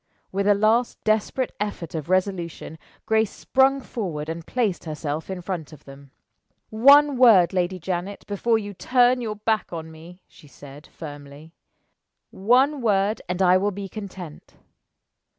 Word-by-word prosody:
With 195 +1 -1
a 205 - +5
last 220 +4 +1
desperate 220 +4 0
effort 205 -5 -4
of 160 0 -5
resolution, 185 -4 -2 0.3
Grace 220 -1 +2
sprung 270 +4 +2
forward 170 -12 -5
and 165 0 -6
placed 220 -10 -1
herself 155 0 -5
in 190 -1 -5
front 175 -4 -5
of 150 - -15
them. 140 0 -14 0.6
"One 280 +5 +6
word, 210 -8 +6
Lady 185 0 -1
Janet, 180 +3 -5
before 215 +3 0
you 205 -2 -6
turn 250 +4 +2
your 215 -3 -4
back 215 +1 -1
on 160 -1 -7
me," 170 +3 -14
she 150 - -19
said, 140 +2 -14
firmly. 145 0 -11 0.8
"One 255 +8 +2
word, 205 -1 +1
and 180 +1 0
I 180 0 +5
will 200 +2 0
be 200 0 -6
content. 190 -6 -10
195 Hz, 150 wpm, -23 LUFS, 165-220 Hz, 0.8 s, One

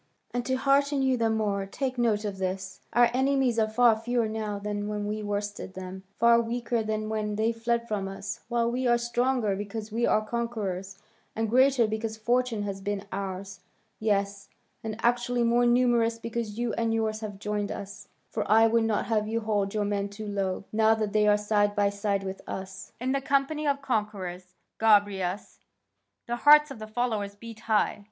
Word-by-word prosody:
And 245 0 -2
to 260 - +1
hearten 280 +1 +2
you 265 -1 +3
the 230 -2 +1
more, 205 -3 0
take 255 +4 -3
note 220 -3 +1
of 200 -2 -4
this: 190 0 -4
our 240 0 +4
enemies 265 -2 +2
are 220 - +3
far 235 +1 +5
fewer 235 +1 0
now 215 -1 -3
than 205 0 -3
when 210 -1 -3
we 215 +1 -3
worsted 205 -2 -4
them, 190 0 -7 0.2
far 235 0 +5
weaker 235 0 -1
than 215 0 -2
when 215 -1 -2
they 220 +2 +1
fled 235 +1 -1
from 205 -3 -2
us, 195 +1 -6
while 235 -1 +1
we 255 +1 -1
are 240 0 +4
stronger 240 -2 0
because 210 +2 -6
we 235 +2 +1
are 215 - +2
conquerors, 205 -5 -3 0.4
and 225 -1 -1
greater 260 -1 +5
because 220 0 -3
fortune 240 -1 0
has 195 -1 -4
been 205 0 -3
ours; 195 0 -5 0.4
yes, 200 -2 -1 0.3
and 220 -1 -4
actually 240 0 +2
more 240 +1 +3
numerous 240 -2 +3
because 230 -2 -4
you 240 -2 -1
and 230 -1 0
yours 220 -1 -1
have 210 -3 -6
joined 205 0 -2
us, 200 0 -8 0.2
for - - -2
I 220 +2 +6
would 225 0 +3
not 215 -2 0
have 215 -2 0
you 230 +1 -1
hold 205 -2 -1
your 210 -1 +1
men 200 0 -1
too 210 +2 -8
low, 195 -2 -2
now 220 0 +4
that 215 -2 -2
they 210 0 +3
are 210 0 +5
side 205 -1 +1
by 200 -1 +2
side 200 -1 -1
with 190 0 -5
us. 190 0 -7
In 255 +2 -1
the 275 0 0
company 280 +3 0
of 280 -1 0
conquerors, 185 -7 -3 0.2
Gobryas, 205 -3 +2 0.7
the 240 0 -2
hearts 300 +3 +7
of 260 - -8
the 215 - -7
followers 215 -3 -2
beat 225 +1 -10
high. 215 -2 +1
220 Hz, 190 wpm, -27 LUFS, 205-235 Hz, 0.7 s, hearts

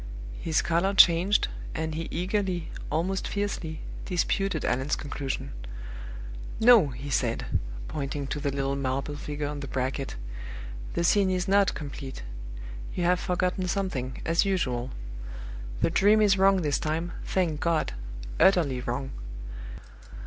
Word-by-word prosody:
His 160 -1 +2
color 175 +4 +2
changed, 180 +3 +6 0.3
and 160 0 -1
he 165 +1 -3
eagerly, 185 -1 -1 0.2
almost 180 +5 0
fiercely, 195 -6 -2 0.2
disputed 185 -1 +1
Allan's 130 +3 +1
conclusion. 140 -2 -4 1.1
"No!" 225 -7 +8
he 140 +2 -6
said, 115 -1 +1 0.4
pointing 140 -1 -3
to 145 - -3
the 145 -1 0
little 140 0 0
marble 135 +2 -1
figure 145 0 -3
on 145 0 -4
the 140 - -5
bracket, 130 +1 -2 0.8
"the 170 - +1
scene 195 +2 +4
is 180 -1 0
not 200 0 +4
complete 140 - -6 0.7
you 180 - 0
have 180 0 +4
forgotten 180 +1 0
something, 145 -10 -1
as 165 +1 +4
usual. 130 -11 0 0.9
The - - +3
Dream 205 +5 +5
is 205 -2 +5
wrong 195 -1 +5
this 145 -2 +2
time, 160 +3 -1
thank 170 -5 0
God 165 - +1 0.5
utterly 155 -10 +4
wrong! 135 +2 -2
160 Hz, 130 wpm, -28 LUFS, 140-185 Hz, 1.1 s, No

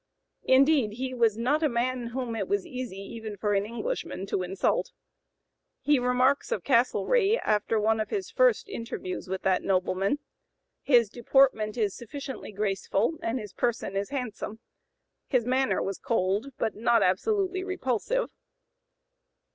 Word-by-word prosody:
Indeed, 265 -4 +4
he 255 +3 -4
was 230 -4 +2
not 270 +7 +1
a 305 - +3
man 245 0 -1
whom 240 -1 -4
it - - -2
was 405 -1 0
easy 255 - -6
even 210 +1 -7
for 205 +1 0
an 200 +1 +1
Englishman 240 - -4
to 195 - -1
insult. 185 +1 -1 0.9
He 295 -2 +3
remarks 250 +3 +2
of - - -1
Castlereagh, 395 - +3
after 215 +1 +1
one 220 +1 +2
of 215 - -2
his 395 -3 -3
first - - +3
interviews 230 - -5
with 190 0 -4
that 185 -1 +2
nobleman: 190 +5 +1 0.6
"His 240 -5 +4
deportment 240 -1 +2
is 210 -4 +1
sufficiently 265 +1 -7
graceful, 205 +7 -1
and 230 +3 -1
his 210 -5 -7
person 235 -5 -1
is 200 +1 -1
handsome. 245 -5 -4 0.7
His 250 -4 +1
manner 260 +1 +1
was 195 - -4
cold, 205 +1 0
but 220 - -1
not 230 +1 +3
absolutely 375 - +1
repulsive." 375 - -1
235 Hz, 145 wpm, -27 LUFS, 210-275 Hz, 0.9 s, Indeed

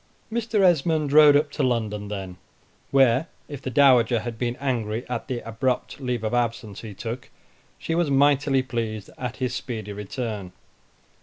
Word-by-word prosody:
Mr. 225 -2 0
Esmond 160 -4 +2
rode 150 -1 +8
up 145 0 +2
to - - -3
London 110 -5 -1
then, 95 -3 -6 0.5
where, 135 +1 +4 0.2
if 145 -3 -8
the 130 - -4
Dowager 125 -4 +4
had 120 0 -5
been 120 -1 -1
angry 120 -4 -2
at 125 - -4
the 120 -3 -4
abrupt 125 +5 -2
leave 125 -3 -2
of 110 - -2
absence 115 -4 -2
he 110 -3 -9
took, 120 +4 -6 0.5
she 165 - -3
was 170 -2 +1
mightily 140 -1 +3
pleased 115 -5 -4
at 125 0 -4
his 125 -1 -2
speedy 110 -4 -5
return. 105 -2 -5
125 Hz, 160 wpm, -24 LUFS, 110-140 Hz, 0.5 s, rode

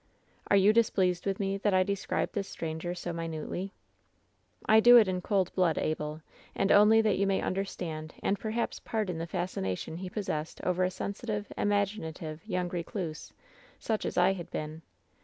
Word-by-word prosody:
"Are 200 - +6
you 200 +2 +5
displeased 190 -6 +2
with 195 -1 -1
me, 195 -1 -1
that 200 -1 +1
I 185 - +5
describe 200 +1 -2
this 200 -3 -3
stranger 165 +2 -4
so 175 -1 -4
minutely? 165 +3 -4 0.9
"I 220 0 +6
do 240 +2 +9
it 220 -4 +6
in 185 -1 -1
cold 190 -2 0
blood, 180 -4 +2
Abel, 155 0 -2 0.3
and 195 - +1
only 215 +2 +7
that 220 -1 +2
you 200 - +3
m - - +1
ay 195 - +1
understand 170 -5 -4
and 200 - +1
perhaps 225 +2 -2
pardon 205 -7 -2
the 165 - -4
fascination 160 - -3
he 185 +1 -5
pos 205 +2 -4
sessed 155 -1 -3
over 185 0 +1
a 180 - +2
sensitive, 205 +2 -4
imaginative 195 -6 -1
young 180 -3 -1
recluse, 170 -2 -5 0.5
such 220 -2 -2
as - - -4
I 180 +2 +5
had 175 -3 -7
been. 155 +1 -5
185 Hz, 175 wpm, -30 LUFS, 165-205 Hz, 0.9 s, do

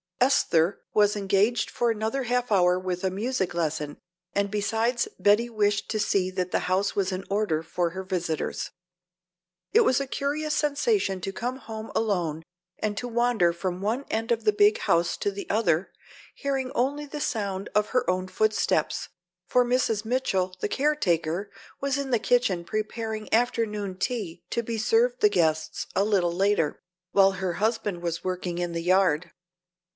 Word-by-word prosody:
Esther 195 -9 +3
was 210 0 +4
engaged 200 +3 +1
for 240 - 0
another 225 +5 -1
half 245 0 -1
hour 180 -2 +4
with 185 -1 -3
a 190 - +1
music 200 -2 -1
lesson 155 -3 -2 0.4
and 200 0 +1
besides 225 +3 0
Betty 210 +4 +4
wished 205 -2 0
to 215 - -1
see 195 -2 +1
that 185 -1 -2
the - - +1
house 190 +2 +1
was 195 -1 0
in 185 0 -3
order 200 -6 +1
for 170 +1 -1
her 190 +2 -5
visitors. 175 -4 -2 1.0
It 455 - +7
was 260 - +3
a 275 - -3
curious 300 +3 -1
sensation 290 - +1
to 195 - -3
come 245 +6 -3
home 220 -3 -8
alone 175 -8 0 0.4
and 210 -1 -2
to 245 - -3
wander 235 -7 +2
from 180 +1 -3
one 230 +7 -1
end 225 +1 -1
of 230 -1 +1
the 215 - +4
big 205 +1 +4
house 170 0 +1
to 205 - -1
the 200 0 -7
other, 195 -5 +1 0.4
hearing 270 -2 -2
only 285 +3 0
the 295 +1 -6
sound 200 -6 -2
of 210 0 +2
her 250 -1 +1
own 185 0 0
footsteps, 215 +3 0 0.4
for 250 +4 +3
Mrs. 240 -3 +1
Mitchell, 195 -7 0
the - - +1
caretaker, 200 - 0 0.3
was 275 0 0
in 280 -1 -3
the 235 - +3
kitchen 240 -7 +2
preparing 215 +2 -4
afternoon 215 -5 0
tea 205 -6 -3
to 235 - 0
be 230 0 -3
served 480 - +2
the 420 - +6
guests 160 - 0
a 195 - +3
little 190 -5 +2
later, 190 -4 +1 0.3
while 195 -1 +5
her 185 -2 -2
husband 210 -3 -1
was 170 -1 -3
working 180 -1 -3
in 175 -1 -2
the 170 0 -3
yard. 180 -2 +2
205 Hz, 170 wpm, -26 LUFS, 185-240 Hz, 1.0 s, It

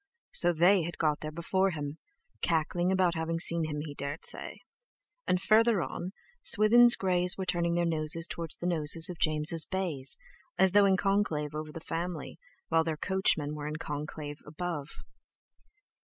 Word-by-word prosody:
So - - +4
they 175 +4 +4
had 170 0 -6
got 150 -2 0
there 155 - -6
before 190 +4 0
him—cackling 165 - -3
about 185 -2 +2
having 165 0 -3
seen 165 -1 +2
him, 150 -1 -4
he 150 -1 -7
dared 140 +2 -6
say! - - -5 0.7
And 180 - +2
further 220 -1 +3
on, 180 - -6 0.3
Swithin's 235 +3 +6
greys 180 -1 +2
were 190 - -3
turning 170 -1 0
their 175 0 +1
noses 160 0 +1
towards 165 -2 -5
the - - -7
noses 165 -1 +2
of 170 - -11
James' 155 +1 +3
bays, 175 -9 -2 0.4
as 190 -1 +3
though 205 +1 +5
in 190 -1 +3
conclave 185 -7 -1
over 155 0 -6
the 165 - -8
family, 165 0 -5 0.3
while 165 0 +3
their 160 -1 -3
coachmen 160 -5 0
were 150 -1 -6
in 150 - -4
conclave 150 -1 -6
above. 155 -1 -5
165 Hz, 160 wpm, -29 LUFS, 155-185 Hz, 0.7 s, Swithin's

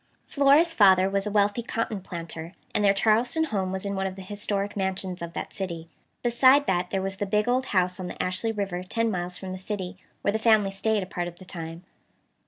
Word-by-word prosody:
Flora's 290 +4 +4
father 190 - +6
was 195 +1 0
a - - -2
wealthy 205 +2 +2
cotton 230 -3 -3
planter, 170 -1 -7 0.2
and 210 - +1
their 200 - +6
Charleston 225 +9 +2
home 195 -10 -1
was 190 +1 -3
in 200 - -2
one 190 0 -1
of 190 - -6
the 190 - -9
historic 205 0 -1
mansions 190 -2 -2
of 170 0 -6
that - - -5
city. 170 -4 -5 0.3
Beside 260 +4 +5
that 180 -1 0
there 195 -1 -1
was 195 0 -3
the 205 - -2
big 210 +2 +1
old 255 +2 +1
house 180 -1 +1
on 185 - -4
the - - -8
Ashley 185 +5 -1
River 195 -4 -3
ten 230 +5 -1
miles 180 -1 -3
from 190 -1 -7
the 185 - -5
city, 190 -2 -5 0.3
where 200 - +2
the 220 - -1
family 220 -3 +4
stayed 210 +1 0
a - - -5
part 175 -2 -4
of 175 0 -9
the 185 - -12
time. 165 0 -7
195 Hz, 225 wpm, -26 LUFS, 185-215 Hz, 0.3 s, father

